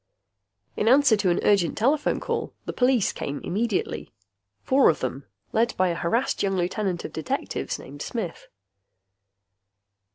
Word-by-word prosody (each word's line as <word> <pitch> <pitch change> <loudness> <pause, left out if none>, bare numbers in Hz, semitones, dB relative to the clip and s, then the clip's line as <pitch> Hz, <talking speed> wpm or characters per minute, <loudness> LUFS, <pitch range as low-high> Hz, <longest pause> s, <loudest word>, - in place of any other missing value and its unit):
In 210 - -1
answer 265 -1 +6
to 200 -3 +1
an 175 - +2
urgent 195 -5 +3
telephone 275 +6 +2
call, - - -3
the - - -4
police 250 -4 +2
came 140 +1 -4
immediately, 190 - -2 0.5
four 270 +1 +5
of 160 - +1
them, 130 +2 -4 0.3
led 230 +2 +1
by 185 -1 +3
a - - 0
harassed 225 +10 0
young 195 -1 +1
lieutenant 180 0 -1
of - - -7
detectives - - -3
named 145 +2 -11
Smith. 220 -8 -5
200 Hz, 140 wpm, -25 LUFS, 170-235 Hz, 0.5 s, answer